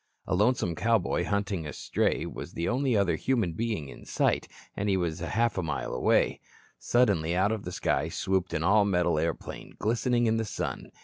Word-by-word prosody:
A 95 - -2
lonesome 105 -2 +2
cowboy 105 -2 +1
hunting 100 -5 -1
a 75 - -6
stray - - 0
was - - -7
the 85 - -2
only 130 -2 +1
other 100 -3 +2
human 115 -10 0
being 110 -7 -2
in - - -11
sight, - - 0 0.3
and 100 +1 -1
he 95 - +3
was 85 -2 -2
a 85 - -3
half 115 -3 +1
mile 80 -3 -3
away. - - +2 0.4
Suddenly 95 -9 +2
out 95 +4 +2
of 110 -2 -3
the 90 - -4
sky - - 0
swooped 95 -3 -1
an 80 - -1
all 105 +4 +5
metal 90 -5 +2
airplane, 80 0 -4
glistening 120 +2 +1
in 110 0 +2
the 115 - 0
sun. 100 - -4
100 Hz, 190 wpm, -28 LUFS, 85-115 Hz, 0.4 s, all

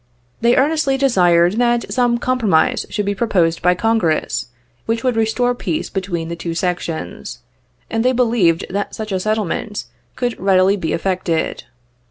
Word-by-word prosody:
They 235 +1 +4
earnestly 280 -1 +2
desired 180 -8 +3
that 240 -1 +1
some 245 -2 +2
compromise 245 -2 +1
should 210 -2 -2
be 200 - 0
proposed 180 -6 +1
by 180 +1 +3
Congress, 180 - 0 0.4
which 225 0 -1
would 255 -2 +1
restore 225 +2 +1
peace 310 +6 -3
between 180 -4 -3
the 170 - -4
two 170 0 -5
sections, 175 -2 -3 0.5
and 225 0 -1
they 255 - +3
believed 225 -10 +2
that 200 +2 -3
such 215 -1 -6
a 190 - 0
settlement 215 0 -2 0.3
could 245 -2 -2
readily 190 0 +3
be 165 -6 -3
effected. 175 -2 -1
210 Hz, 150 wpm, -18 LUFS, 180-240 Hz, 0.5 s, They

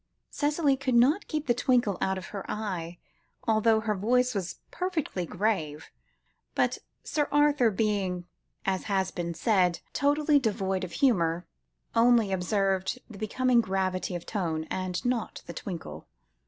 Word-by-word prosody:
Cicely 290 -1 +2
could 265 -2 -1
not 275 +11 +4
keep 305 -1 -2
the 240 - +3
twinkle 245 -5 +1
out 190 0 +1
of 185 - -7
her 200 -2 -4
eyes, 180 -6 -3 0.5
although 220 0 +4
her 220 -1 0
voice 250 +5 +2
was 190 -4 -3 0.2
perfectly 330 - -2
grave; 160 -7 -2 0.6
but - - +1 0.2
Sir 295 -2 0
Arthur, 290 -5 +4
being, 195 -4 -1 0.4
as 190 -1 -1
has 190 -2 0
been 170 -1 -4
said, 180 -1 +2
totally 290 +1 +3
devoid 195 -5 -1
of 180 - -6
humour, 180 - +2 0.5
only 230 -3 +4
observed 190 +2 0
the 200 - -10
becoming 245 +3 +2
gravity 185 -2 -1
of 175 - -5
tone, 165 -7 -2
and 185 +1 -3
not 245 -3 -2
the - - -7
twinkle. 160 - -7
210 Hz, 140 wpm, -28 LUFS, 185-250 Hz, 0.6 s, not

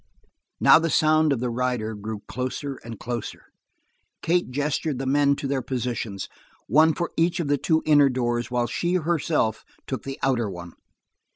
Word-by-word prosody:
Now - - +7
the 165 0 -1
sound 155 0 +3
of 130 -4 0
the 125 -1 -1
rider 120 -2 -1
blew 105 0 -6
closer 130 +2 -4
and 115 -1 -8
closer. 120 -2 -5 0.8
Kate 175 -1 +1
gestured 145 +1 -1
the 135 - -4
men 140 +1 +3
to 140 - -6
their 135 -1 -1
positions, 120 -6 -3 0.4
one 155 +6 +4
for 170 - -3
each 170 +2 +1
of 160 -4 -2
the 145 -1 +2
two 160 +3 +1
inner 145 -2 +5
doors 120 -2 -1
while 125 -1 0
she 175 +9 -1
herself 155 - 0 0.2
took 130 - -4
the 135 0 -6
outer 120 -5 +1
one. 85 -2 -8
135 Hz, 170 wpm, -24 LUFS, 120-155 Hz, 0.8 s, Now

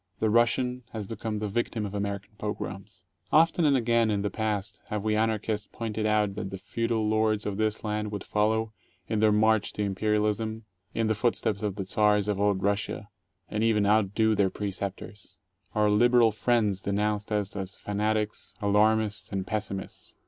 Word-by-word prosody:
The 110 - +2
Russian 120 +2 +2
has 110 -2 -4
become 110 +1 -4
the 105 0 -2
victim 110 +1 -1
of 100 - -6
American 100 0 -3
pogroms! 95 -2 -6 0.3
Often 165 +1 +4
and 140 -2 +4
again 115 -2 +2
in 100 -2 0
the 105 - -1
past 105 -2 -2
have 105 -1 -2
we 110 0 +1
Anarchists 110 -1 0
pointed 110 -1 -2
out 105 -2 +2
that 100 -1 -4
the 95 - -6
feudal 115 +2 -1
lords 110 -1 +1
of 100 -1 -2
this 110 0 -1
land 105 -1 -2
would 100 -2 -4
follow, 110 +1 0 0.3
in 110 -1 0
their 110 0 +4
march 110 0 +3
to 105 - -2
imperialism, 105 +2 0 0.3
in 115 - +1
the 110 - +2
footsteps 110 -2 0
of 105 -3 -2
the 100 -2 -4
Czars 105 +1 +2
of 105 -2 0
old 100 -2 +1
Russia, 100 0 -1 0.4
and 105 +1 -2
even 110 -2 +3
outdo 110 +1 +3
their 100 -2 +2
preceptors. 100 +1 -5 0.4
Our 105 -1 +3
liberal 120 +1 +5
friends 105 -3 +1
denounced 105 +1 -1
us 105 -2 -1
as 95 -1 -5
fanatics, 105 +1 -2
alarmists, 105 +1 +2
and 95 -1 -2
pessimists. 105 -3 -5
105 Hz, 170 wpm, -28 LUFS, 100-110 Hz, 0.4 s, liberal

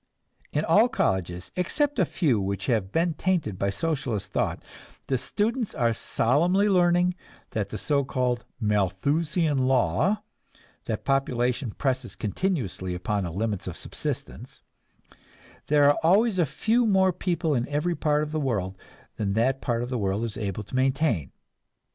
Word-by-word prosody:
In 150 - 0
all 215 +9 +5
colleges, 90 - -1
except 285 - 0
a - - +4
few 135 - +1
which 100 0 -2
have 110 -6 0
been 165 +1 +1
tainted 160 - -1
by 100 - +1
Socialist 110 -3 -2
thought, - - -1 0.4
the 135 - 0
students 215 - -1
are 120 -4 +2
solemnly 170 - +2
learning 180 -2 +3 0.4
the 110 -1 -3
so 140 +6 +1
called 125 -2 -1 0.2
"Malthusian 140 - +1
law," 135 - +2 0.6
that - - -3
population 125 -2 0
presses 130 +2 -2
continually 105 - -2
upon 100 +2 -1
the 85 - -4
limits 100 +1 -2
of 90 - -5
subsistence, - - -6 1.0
there 145 0 +4
are 145 - +4
always 195 +4 +3
a 165 - +3
few 225 - +1
more 190 -2 +4
people 170 -3 -1
in 120 -2 0
every 150 +4 0
part 150 -2 +1
of 150 - -5
the 155 - -1
world 100 -9 -1 0.4
than 100 -2 -1
that 130 +5 +1
part 120 -1 -1
of 120 - -5
the 125 - -1
world 100 +2 0
is 115 -3 -3
able 105 -1 -3
to 105 - -8
maintain. 130 - +1
130 Hz, 150 wpm, -26 LUFS, 105-170 Hz, 1.0 s, all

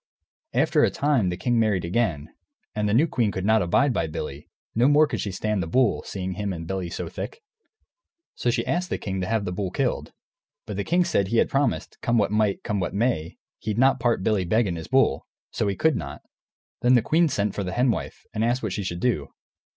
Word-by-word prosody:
After - - +3
a - - +4
time, 140 -10 +1
the 90 - -3
king 120 +4 +1
married 105 -6 +1
again, 85 -7 -1 0.4
and 105 -1 0
the - - +1
new 145 +7 +5
queen 120 -9 0
could 95 -1 -4
not 110 +1 +4
abide 130 +10 +2 0.2
Billy; 75 -3 -6 0.2
no 120 +3 +3
more 150 +2 +6
could - - -3
she 100 - -3
stand 105 +1 -1
the 85 - -3
bull, 125 +7 +2
seeing 95 -1 -4
him 100 +1 -3
and 85 -2 -5
Billy 95 0 -3
so 85 0 -4
thick. 270 - -7 0.9
So 120 - -1
she 120 - 0
asked 180 +2 -1
the - - -1
king 95 -1 -4
to 90 - -2
have 110 -1 0
the 90 - -2
bull 95 +1 -2
killed. - - -2 0.5
But 105 - -5
the 100 - -2
king 175 - +2
said 100 - +1
he 115 - 0
had - - +3
promised, 140 +1 -1
come 120 0 +1
what 105 -2 +2
might, 105 -2 +1
come 105 -1 -1
what 90 - -2
may, 105 -8 0 0.2
he'd 110 0 -3
not 130 +2 +4
part 115 -5 +1
Billy 105 -3 +2
Beg 110 +6 +2
and 90 -3 -2
his 80 - -7
bull, - - +2 0.2
so 105 - -1
he 100 - 0
could 160 +4 +2
not. 70 - -6 0.6
Then 125 +1 +5
the 120 - +4
queen 165 +4 +3
sent 105 -5 -1
for 100 - -3
the 90 0 -4
Hen 125 +2 +3
Wife, - - -5
and 110 - -1
asked 120 +2 +1
what 105 -4 -2
she - - -2
should 85 -1 -4
do. 110 - 0
105 Hz, 235 wpm, -25 LUFS, 95-120 Hz, 0.9 s, more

